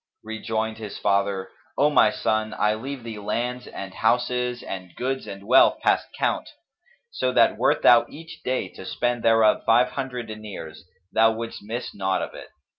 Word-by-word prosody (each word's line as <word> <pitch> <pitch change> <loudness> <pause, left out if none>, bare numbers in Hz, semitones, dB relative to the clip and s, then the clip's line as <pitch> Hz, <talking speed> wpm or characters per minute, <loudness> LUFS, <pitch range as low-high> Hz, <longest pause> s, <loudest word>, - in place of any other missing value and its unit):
Rejoined 110 0 -3
his 105 -2 -7
father, 100 -1 0 0.3
"O 145 +2 +4
my 110 - +6
son, 110 +1 -1
I 105 0 +2
leave 130 +3 -6
thee 110 -2 -7
lands 125 +4 -3
and 95 -1 -7
houses 125 +2 0
and 90 -3 -7
goods 130 +1 -3
and 100 0 -8
wealth 130 +4 +5
past - - +2
count; - - -1 0.6
so - - -1
that - - +4
wert - - +1
thou - - +7
each 165 +2 -11
day 130 -6 -1
to - - -11
spend 120 +5 -1
thereof 115 -1 +4
five 120 +2 +4
hundred 125 -3 -4
dinars, 105 -8 -9 0.3
thou 110 0 +5
wouldst 115 +1 -6
miss 115 +4 -5
naught 95 -1 -1
of - - -6
it. - - -10
110 Hz, 170 wpm, -24 LUFS, 105-125 Hz, 0.6 s, thou